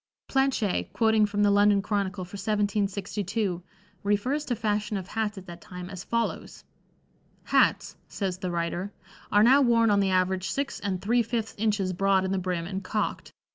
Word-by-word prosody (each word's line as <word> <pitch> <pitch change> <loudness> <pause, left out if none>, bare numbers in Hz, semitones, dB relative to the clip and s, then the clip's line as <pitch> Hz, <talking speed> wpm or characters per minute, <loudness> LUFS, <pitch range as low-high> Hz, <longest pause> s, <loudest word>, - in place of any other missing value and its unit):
Planché, 270 -7 0
quoting 220 -2 +3
from 205 0 0
the 205 - +4
London 205 0 +5
Chronicle 200 -2 -2
for 180 - -19
1762, 200 -1 -1 0.4
refers 210 +9 0
to 245 - -1
fashion 210 -2 -1
of 185 -1 -7
hats 215 -2 -2
at 190 - -9
that 175 -2 -10
time 180 +1 -8
as 185 -2 -7
follows: 230 0 -3 0.8
"Hats," - - +2
says 185 -3 -3
the 185 - -3
writer, 175 +3 -2 0.4
"are 205 +1 +5
now 265 +5 +6
worn 230 -3 +4
on 200 - +4
the 195 -1 +2
average 185 0 +1
six 280 0 -2
and 190 -2 -3
three 235 +4 +3
fifths 225 -1 -3
inches 205 -3 0
broad 195 +1 +2
in 190 - -2
the 195 - 0
brim 180 -2 -2
and 190 +2 -5
cocked. 210 +3 -3
205 Hz, 175 wpm, -27 LUFS, 185-220 Hz, 0.8 s, now